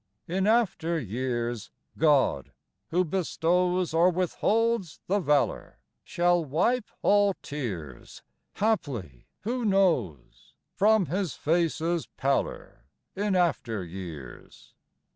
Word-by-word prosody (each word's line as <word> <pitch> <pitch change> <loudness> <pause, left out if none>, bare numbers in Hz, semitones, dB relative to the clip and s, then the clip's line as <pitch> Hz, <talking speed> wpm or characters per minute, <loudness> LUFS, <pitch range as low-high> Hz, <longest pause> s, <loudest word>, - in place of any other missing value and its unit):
In 190 +3 0
after 195 -7 +1
years 120 -1 -3 0.3
God, 145 - +2 0.4
who 180 +2 +2
bestows 180 0 0
Or 170 +2 +5
withholds 195 +2 0
the 200 +3 +1
valor, 150 -6 0 0.3
Shall 175 0 +2
wipe 185 - 0
all 205 -1 +4
tears 95 - -6 0.3
Haply, 130 - -2
who 240 +5 -2
knows? 165 - 0 0.2
From 215 -1 +4
his 180 0 -2
face's 165 0 0
pallor 135 0 -2 0.3
In 200 0 0
after 135 - 0
years. 85 -6 -10
170 Hz, 95 wpm, -27 LUFS, 130-195 Hz, 0.4 s, Or